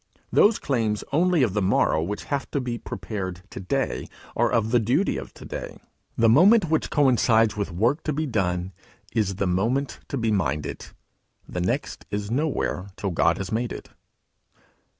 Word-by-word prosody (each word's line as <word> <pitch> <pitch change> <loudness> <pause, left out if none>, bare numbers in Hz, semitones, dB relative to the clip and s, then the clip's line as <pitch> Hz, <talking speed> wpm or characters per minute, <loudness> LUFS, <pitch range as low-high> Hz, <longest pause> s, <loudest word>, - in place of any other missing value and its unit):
Those 210 +2 +5
claims 110 -6 -1
only 170 0 +3
of 110 -7 +1
the 105 - 0
morrow 95 -4 +2
which 100 +6 -3
have 140 -1 -3
to 140 - -1
be 120 -2 -3
prepared 95 -4 -5
to - - -7
day 135 +8 -2 0.3
are 120 +1 +2
of 115 -2 +1
the 120 - +5
duty 125 - +1
of - - -6
to - - -11
day; - - -6 0.4
the 115 - +4
moment 175 - +6
which 160 - +1
coincides 115 -6 +3
with 100 -2 -3
work 120 - +1
to 155 - 0
be 155 +2 -1
done, 95 -7 -1 0.4
is 100 -3 0
the 100 - -1
moment 115 +10 0
to 140 - -3
be 115 -2 0
minded; 85 -7 -2 0.6
the 90 - -4
next 90 - -2
is 105 +1 -3
nowhere 135 - -1
till 100 - -2
God 85 0 +2
has 95 -1 -5
made 115 +2 -1
it. - - -8
115 Hz, 175 wpm, -25 LUFS, 95-135 Hz, 0.6 s, moment